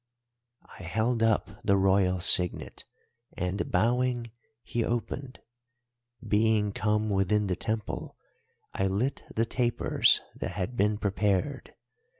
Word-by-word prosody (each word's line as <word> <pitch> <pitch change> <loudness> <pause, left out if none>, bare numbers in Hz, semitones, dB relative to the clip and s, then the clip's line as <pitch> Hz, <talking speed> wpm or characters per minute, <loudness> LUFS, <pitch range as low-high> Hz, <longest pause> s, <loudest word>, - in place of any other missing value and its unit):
"I - - -14
held 110 +7 -1
up 105 -3 0
the 100 -2 +3
Royal 95 -1 +2
signet, 90 -1 +2 0.5
and, 90 +3 -2
bowing, 120 +4 +1 0.3
he 120 - -2
opened. 125 +3 -4 0.9
Being 105 -1 +2
come 105 +1 0
within 100 +2 +1
the 95 -2 -1
Temple 110 +1 -4 0.6
I 95 - 0
lit 110 +9 -1
the 115 - +2
tapers 120 0 +2 0.2
that - - -4
had 110 +7 -4
been 105 -1 +1
prepared. 100 +6 -1
105 Hz, 115 wpm, -28 LUFS, 95-115 Hz, 0.9 s, the